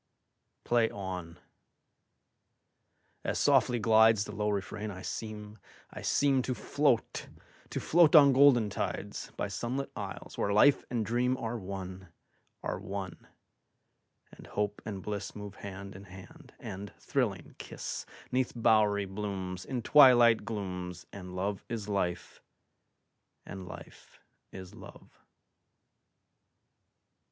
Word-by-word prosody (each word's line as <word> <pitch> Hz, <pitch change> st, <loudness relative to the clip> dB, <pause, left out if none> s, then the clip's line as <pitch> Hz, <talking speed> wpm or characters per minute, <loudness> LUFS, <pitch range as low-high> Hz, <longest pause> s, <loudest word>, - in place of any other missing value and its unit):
Play 120 Hz, -2 st, +2 dB
on! 90 Hz, -4 st, -6 dB, 1.9 s
As -, -, -1 dB
softly 120 Hz, -1 st, +3 dB
glidesThe 110 Hz, -1 st, +4 dB
low 105 Hz, 0 st, 0 dB
refrain, 105 Hz, +1 st, -3 dB
I 95 Hz, -2 st, -8 dB
seem, 105 Hz, -1 st, -6 dB, 0.3 s
I -, -, -8 dB
seemTo 130 Hz, -3 st, +2 dB
float, 105 Hz, -, 0 dB, 0.4 s
to -, -, -3 dB
float 165 Hz, -1 st, +5 dB
on 140 Hz, -3 st, +8 dB
golden 130 Hz, -6 st, +5 dB
tides, -, -, -4 dB
By -, -, -1 dB
sunlit 130 Hz, +4 st, -3 dB
isles, -, -, -7 dB
where 100 Hz, -, +1 dB
life 130 Hz, +7 st, +5 dB
and 115 Hz, -3 st, -1 dB
dreamAre 120 Hz, 0 st, -1 dB
one, 95 Hz, -1 st, -7 dB, 0.6 s
are -, -, -3 dB
one; 95 Hz, -2 st, -6 dB, 1.0 s
and -, -, -14 dB
hope 105 Hz, 0 st, -2 dB
and 100 Hz, -3 st, -5 dB
blissMove 105 Hz, 0 st, -6 dB
hand 100 Hz, 0 st, -8 dB
in 100 Hz, +1 st, -11 dB
hand, 95 Hz, 0 st, -14 dB
and 100 Hz, +2 st, -7 dB
thrilling, -, -, -2 dB
kiss'Neath 130 Hz, 0 st, -4 dB
bowery 105 Hz, -3 st, +3 dB
blooms, 95 Hz, -2 st, -5 dB
In 125 Hz, -3 st, -3 dB
twilight 120 Hz, -6 st, +7 dB
glooms, 90 Hz, -5 st, -5 dB
And 90 Hz, -2 st, -8 dB
love 95 Hz, +2 st, -2 dB
is 110 Hz, -3 st, -4 dB
life, 95 Hz, -4 st, -2 dB, 1.0 s
and 95 Hz, -1 st, -8 dB
life -, -, -12 dB, 0.3 s
is 95 Hz, -1 st, -10 dB
love. -, -, -14 dB
105 Hz, 110 wpm, -30 LUFS, 95-120 Hz, 1.9 s, on